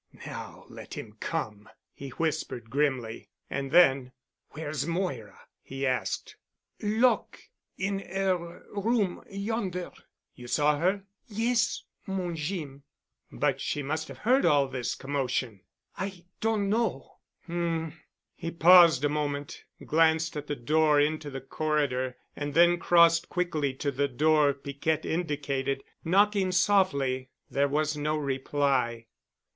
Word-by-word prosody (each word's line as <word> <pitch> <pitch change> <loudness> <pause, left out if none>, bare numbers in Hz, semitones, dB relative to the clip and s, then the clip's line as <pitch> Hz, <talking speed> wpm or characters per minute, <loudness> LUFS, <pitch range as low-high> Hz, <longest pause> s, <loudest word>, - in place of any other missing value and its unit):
"Now - - -8
let - - -10
him - - -8
come," 105 -1 -4 0.2
he 140 - -8
whispered 130 -6 -3
grimly. 130 -5 -1 0.2
And 140 0 -2
then, 135 -7 +5 0.4
"Where's 150 -1 -4
Moira?" 165 - -3 0.2
he 135 +1 -4
asked. 425 - -2 0.4
"Lock' 220 +4 +2 0.4
in 195 +1 -1
'er 180 -2 -2
room—yonder." 200 -2 -2 0.4
"You 125 - -11
saw 145 +3 +2
her?" 190 +4 +1 0.2
"Yes, 230 +2 0 0.2
mon 185 -3 -2
Jeem." 150 -4 -4 0.5
"But - - 0
she 145 - -2
must 155 +3 -2
have - - -10
heard 255 +5 +3
all 145 -4 +4
this 130 -2 -3
commotion." 130 -6 -2 0.3
"I 190 -2 -5
doan 220 -2 +1
know." 210 - -1 0.3
"Um." 165 -2 -2 0.4
He 165 - -5
paused 170 -4 +7
a - - +5
moment, 145 -1 -3 0.2
glanced 160 0 +2
at 150 0 -5
the 145 - -2
door 150 +3 +3
into 150 0 0
the 135 -1 -6
corridor, 135 -3 -1 0.2
and 145 -1 -4
then 175 +1 +5
crossed 170 -1 +5
quickly 160 -6 0
to 140 +1 -2
the 140 +2 0
door 150 +2 +3
Piquette 140 +3 -2
indicated, 140 -5 -2 0.2
knocking 195 +2 +3
softly. 140 -9 +2 0.2
There 140 +1 +2
was 150 +2 0
no 150 +1 -1
reply. 135 -4 0
155 Hz, 125 wpm, -28 LUFS, 140-180 Hz, 0.5 s, paused